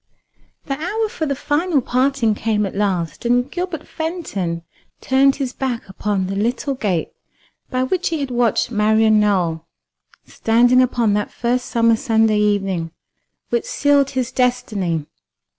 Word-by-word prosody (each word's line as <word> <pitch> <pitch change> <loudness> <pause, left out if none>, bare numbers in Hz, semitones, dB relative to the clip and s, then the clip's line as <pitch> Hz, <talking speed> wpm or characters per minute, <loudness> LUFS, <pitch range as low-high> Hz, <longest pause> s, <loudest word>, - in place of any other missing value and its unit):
The 275 -1 -3
hour 430 +7 -1
for 345 -9 -3
the 280 - -1
final 300 +3 +1
parting 255 -2 +1
came 210 0 0
at 195 - -5
last, 190 -4 -1
and 245 +2 +1
Gilbert 355 -4 -4
Fenton 205 - -4 0.4
turned 270 +1 +3
his 265 -3 -3
back 255 -4 -3
upon 195 0 -2
the 195 +1 -4
little 240 +7 -1
gate 195 -10 -1 0.6
by 255 0 0
which 355 +7 0
he 325 -2 -2
had 275 -2 -3
watched 240 0 +1
Marian 220 0 +3
Nowell 175 -6 0 0.6
standing 245 +3 +3
upon 235 -4 +1
that 210 0 -1
first 245 +1 -1
summer 230 -1 +3
Sunday 220 -3 +2
evening 195 -5 0 0.6
which 235 -1 0
sealed 285 -1 +2
his 260 -2 -2
destiny. 205 - 0
240 Hz, 140 wpm, -20 LUFS, 210-275 Hz, 0.6 s, turned